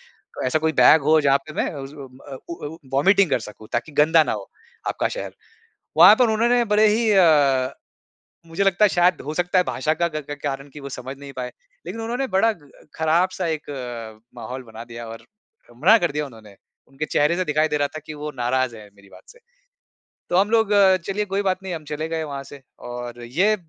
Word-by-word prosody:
तो - - -8
ऐसा 155 +5 +1
कोई 160 0 +1
बैग 145 +5 +7
हो 155 +2 +4
जहाँ 140 -1 +4
पे 155 - -8
मैं - - -1
उज़ 140 +1 -8
उम, 130 -3 -11
अ, 135 -2 -7
उ 170 - -4
अ, - - -3
उ 160 +2 -9 0.2
वोमिटिंग 190 +5 +4
कर - - +1
सकूँ 105 0 -11
ताकि 120 +6 -2
गंदा 155 +2 +4
ना - - -2
हो - - -7 0.4
आपका - - 0
शहर। - - -6 0.6
वहाँ - - +9
पर 245 -3 +4
उन्होंने 240 +2 +2
बड़े 215 +1 +5
ही 220 +1 +2
अ, 145 -9 +4 0.8
मुझे 165 +4 -1
लगता 195 +2 +3
है - - +6
शायद 175 +1 +2
हो 155 - -4
सकता 180 +2 +1
है 180 - +3
भाषा 155 0 -1
का 170 - +3
क 155 -3 -6
क 145 - -5
कारण 140 0 -3
की 150 - -9
वो 140 - -7
समझ 130 +2 -7
नहीं 140 -1 -10
पाए। 125 -1 -5 0.3
लेकिन 195 +6 -6
उन्होंने 245 +4 -2
बड़ा 225 +3 +4 0.4
खराब 160 +3 +2
सा 185 -2 -3
एक 155 -2 -4 0.7
माहौल 130 +1 -7
बना 115 0 -10
दिया 115 0 -9
और 115 0 -10 0.5
मना 190 - +6
कर 175 -5 0
दिया 150 0 -2
उन्होंने, 110 -5 -15 0.3
उनके 135 +3 -5
चेहरे 150 +3 +2
से 185 - 0
दिखाई 155 0 +1
दे 150 - -1
रहा 145 0 +1
था 155 - -8
कि 155 - -7
वो 150 0 -6
नाराज़ 125 -1 0
है 105 -1 -12
मेरी 100 0 -19
बात - - -15
से। 485 - -17 0.9
तो 175 - +2
हम 200 +2 +3
लोग 225 -2 +3 0.4
चलिए 210 +2 -1
कोई 195 0 -1
बात 185 -1 0
नहीं 185 -2 -5
हम 160 - -6
चले 155 +2 -3
गए 160 -1 -2
वहाँ 140 -2 -6
से 140 0 -13 0.3
और 120 0 -7
ये 185 - +2
155 Hz, 225 wpm, -22 LUFS, 135-185 Hz, 0.9 s, वहाँ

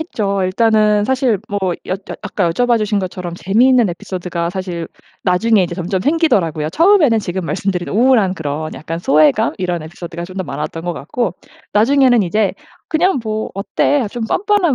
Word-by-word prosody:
했죠. 200 - -2
일단은 210 +2 +2
사실 255 -3 +1
뭐 205 - -2 0.3
여 - - -2
여 - - -3 0.3
아까 195 -4 -1
여쭤봐주신 215 0 +1
것처럼 180 -2 -5
재미있는 230 +6 +3
에피소드가 175 -1 -4
사실 180 -3 -4 0.4
나중에 200 +3 +3
이제 175 - -3
점점 185 +1 -2
생기더라고요. 195 - +1
처음에는 325 - +4
지금 185 -2 -4
말씀드린 180 0 -2
우울한 225 -4 +3
그런 155 -1 -4
약간 165 +1 -5
소외감 150 -4 +3
이런 180 -3 -2
에피소드가 170 +1 -7
좀 185 +2 -11
더 - - -3
많았던 150 +3 -5
것 175 - -1
같고 180 - -3 0.4
나중에는 245 +1 +4
이제 200 +3 +1 0.4
그냥 355 -1 +2
뭐 215 0 -3
어때 220 +6 0
좀 235 0 -4
뻔뻔한 390 - +2
195 Hz, 385 characters per minute, -17 LUFS, 175-235 Hz, 0.4 s, 처음에는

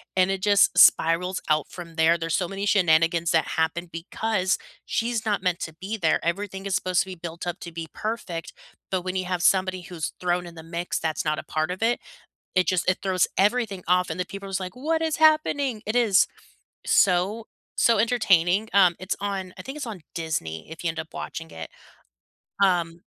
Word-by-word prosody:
And 185 +1 +3
it 195 - -2
just 200 -1 +4
spirals 180 +3 +5
out 155 -1 +2
from 170 -2 -10
there. 165 +1 +4
There's 165 -1 -1
so 180 - -1
many 195 +2 -4
shenanigans 170 -3 +3
that 160 - +2
happen 170 +2 0
because 185 +3 -1 0.3
she's 230 -1 -1
not 205 -4 0
meant 180 -2 0
to 160 - -5
be 195 +7 -5
there. 165 -6 +2
Everything 195 +2 -3
is 195 - -2
supposed 185 -1 +1
to - - -2
be 185 - -7
built 170 0 -7
up 175 - -3
to 170 - -7
be 165 -1 -5
perfect, 210 -7 -4 0.4
but 185 -1 0
when 185 0 -3
you 185 - -2
have 180 -1 -2
somebody 185 -1 +2
who's 175 -2 -5
thrown 180 0 0
in 170 - -11
the 160 - -10
mix 170 +2 -3
that's 160 -1 -2
not 155 0 +1
a - - -7
part 155 +1 -2
of 185 +4 -4
it, 235 +1 +2 0.6
it 185 -1 +3
just 185 -1 +1
it 185 - 0
throws 185 -2 +2
everything 205 -2 +1
off, 180 0 +3
and - - -3
the 180 - -1
people 200 0 -8
are - - -8
just 190 - -1
like, 185 +5 -6
"What 320 +5 0
is 320 -1 0
happening?" 290 -7 +3
It 215 +3 -1
is 215 -5 +5 0.6
so, 195 +5 +2 0.3
so 230 -1 +4
entertaining. 210 -4 +3
Um, 185 -3 +5
it's 185 +1 -2
on 195 -2 -3
I - - -7
think 270 - -7
it's 285 - -4
on 210 -5 -6 0.2
Disney 150 - -4
if 165 - -8
you 170 - 0
end 160 - -4
up 160 - -7
watching 160 0 -6
it, 80 0 -8 0.9
um 170 -3 +1
185 Hz, 210 wpm, -25 LUFS, 170-200 Hz, 0.9 s, spirals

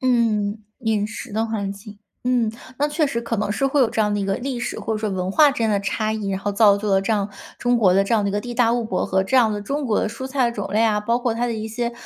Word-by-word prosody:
嗯， 225 -5 +1 0.2
饮 220 -3 0
食 225 +1 -8
的 220 +2 0
环 205 -3 -3
境。 205 +1 -12 0.3
嗯， 245 -3 +1 0.3
那 290 - +2
确 300 +1 +1
实 235 -4 -2
可 230 0 -3
能 205 0 -1
是 270 +6 +1
会 275 +1 +2
有 235 -4 +3
这 225 - -1
样 210 -1 +2
的 205 - -1
一 - - -1
个 195 0 0
历 255 -1 -4
史， - - -3
或 220 - -2
者 215 - -2
说 215 -1 -2
文 185 0 -2
化 300 +5 +6
之 275 - -5
间 225 -1 +1
的 200 - +1
差 215 +2 -1
异， 210 -2 -3
然 190 - -1
后 205 - -2
造 200 -1 +5
就 210 - -3
了 195 -1 +3
这 220 +3 0
样 205 -1 0 0.3
中 245 0 +2
国 195 -6 +4
的 195 +1 +4
这 215 - +1
样 215 - +2
的 200 - 0
一 - - -5
个 205 - 0
地 240 +1 -6
大 235 -1 +3
物 240 -1 0
博 190 -4 -1
和 190 0 +1
这 260 - +1
样 225 -4 +4
的 205 - -3
中 280 +6 -2
国 220 -4 +1
的 - - 0
蔬 230 +4 -7
菜 265 -2 +1
种 205 -4 -5
类 215 - +2
啊。 210 -2 +2
包 230 +3 +1
括 240 -2 -1
它 240 +1 0
的 235 - -1
一 220 -1 -4
些， 235 +2 -2
220 Hz, 345 characters per minute, -22 LUFS, 205-240 Hz, 0.3 s, 化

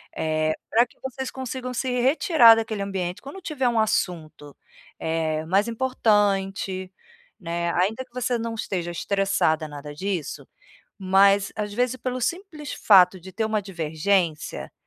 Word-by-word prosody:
Eh, 155 0 0 0.2
pra 235 +2 +4
que - - -26
vocês 265 0 -5
consigam 255 -1 -5
se 255 +2 -2
retirar 265 - +6
daquele 220 -2 -3
ambiente 190 -1 -4
quando 285 +8 -9
tiver 275 -7 -1
um 230 -2 +1
assunto, 165 -9 -2 0.5
eh, 160 -1 -1
mais 195 +6 +2
importante, 200 -6 0 0.5
né. 170 -1 -2
Ainda 215 +8 0
que 250 - -37
você 250 -1 -1
não 230 0 -4
esteja 175 -5 -3
estressada 170 -4 0
nada 145 0 -9
disso, 185 -3 -4 0.5
mas, 195 +1 +4
às 210 -1 -3
vezes, 250 +2 0
pelo 255 0 -4
simples 315 - -4
fato 185 -2 +5
de 190 +2 -11
ter 220 +4 -1
uma 220 -1 0
divergência, 165 -1 -1
200 Hz, 140 wpm, -24 LUFS, 175-245 Hz, 0.5 s, retirar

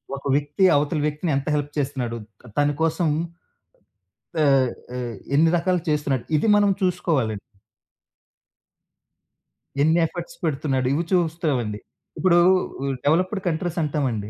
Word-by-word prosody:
ఒక 140 - -10
వ్యక్తి 145 +5 0
అవతల 145 +2 +1
వ్యక్తిని 150 +2 -1
ఎంత 140 - -4
హెల్ప్ 145 0 -2
చేస్తన్నాడు? 130 -5 -2 0.3
త 125 - -13
తని 145 0 +3
కోసం 165 +1 +1 1.4
ఆహ్, 135 -3 +4 0.3
ఆహ్, - - -3
ఎ 120 +2 -6
ఎన్ని 160 +3 +5
రకాలు 180 +1 0
చేస్తున్నాడు? 145 -5 0
ఇది 185 +9 +1
మనం 205 -1 +4
చూసుకోవాలండి. 160 - 0 2.4
ఎన్ని 160 +3 +4
ఎఫర్ట్స్ 175 +1 -8
పెడుతున్నాడు? 135 -4 0
ఇవి 165 +4 0
చూస్తావండి. 155 - 0 0.4
ఇప్పుడూ 175 -2 +4 0.4
ఉ - - -2 0.2
డెవలప్పుడ్ 185 +7 +1
కంట్రీసంటావండి 150 - -1
150 Hz, 120 wpm, -23 LUFS, 135-170 Hz, 2.4 s, ఎన్ని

